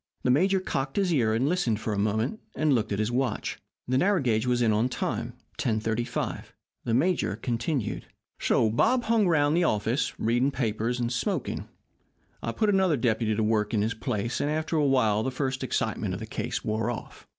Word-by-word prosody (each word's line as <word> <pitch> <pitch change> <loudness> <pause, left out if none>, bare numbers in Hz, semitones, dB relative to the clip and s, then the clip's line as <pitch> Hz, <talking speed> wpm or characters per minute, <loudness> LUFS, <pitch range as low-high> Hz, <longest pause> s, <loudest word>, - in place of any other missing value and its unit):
The 125 - +3
major 190 +8 +3
cocked 135 -7 -3
his 195 -4 +2
ear 110 -7 +2
and 125 +5 +1
listened 145 - +1
for 110 - -2
a 100 - -1
moment, 110 - 0 0.2
and 155 -2 +2
looked 115 -4 0
at 100 - 0
his 110 +2 0
watch. 125 -2 -1 0.3
The 130 +1 +2
narrow 195 +4 +3
gauge 120 -4 +1
was 120 -1 +2
in 110 -2 +3
on 110 +4 +2
time - - -3 0.3
10.35. 110 +1 -1 0.4
The 115 - +1
major 140 - +1
continued: 120 +2 -2 0.3
"So 110 - +2
Bob 245 - +3
hung 225 -4 +3
around 145 -3 +3
the 175 +2 +3
office, 110 0 0
reading 120 +4 +2
the 135 - -10
papers 115 0 -1
and 120 0 -1
smoking. 135 - -2 0.7
I 115 - -2
put 215 - +1
another 190 -6 +3
deputy 115 -2 +1
to 110 - 0
work 105 0 +1
in 105 - +2
his 110 +1 0
place, 115 0 -2
and 145 - 0
after 155 +2 -1
a 155 - +3
while, 110 -6 +3
the 130 - -1
first 130 0 -2
excitement - - -1
of - - -6
the - - -5
case - - -4
wore 110 +1 0
off. 120 - -7
125 Hz, 200 wpm, -27 LUFS, 110-150 Hz, 0.7 s, The